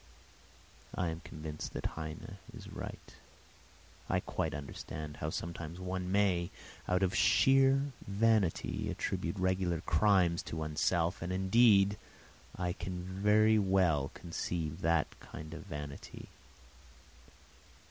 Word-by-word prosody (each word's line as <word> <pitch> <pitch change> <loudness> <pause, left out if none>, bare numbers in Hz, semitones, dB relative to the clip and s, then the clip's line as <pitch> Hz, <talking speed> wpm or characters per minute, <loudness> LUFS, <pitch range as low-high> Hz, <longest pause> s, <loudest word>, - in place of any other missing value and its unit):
I 90 -2 0
am 80 0 -4
convinced 75 -2 -7
that - - -5
Heine 80 -1 -7 0.2
is - - -10
right; - - -8 1.0
I - - +2
quite - - -2
understand 75 +1 -6
how 75 - -2
sometimes 85 +1 -5
one 90 0 -3
may, 95 -4 +2 0.4
out 90 +1 +2
of 95 -1 +2
sheer 135 +7 +4 0.2
vanity, 105 -3 +1
attribute 85 +4 -2
regular 90 -3 +1
crimes 90 0 +3
to 80 - -4
oneself, 80 +2 0
and 85 +1 -3
indeed 100 +1 +5 0.6
I 90 -1 -1
can 90 0 -5
very 105 +4 +4
well 90 -8 +2
conceive 85 -1 -3
that 85 -2 +1
kind 75 +1 -9
of 85 - -8
vanity. 75 -4 -7
90 Hz, 115 wpm, -33 LUFS, 80-95 Hz, 1.0 s, indeed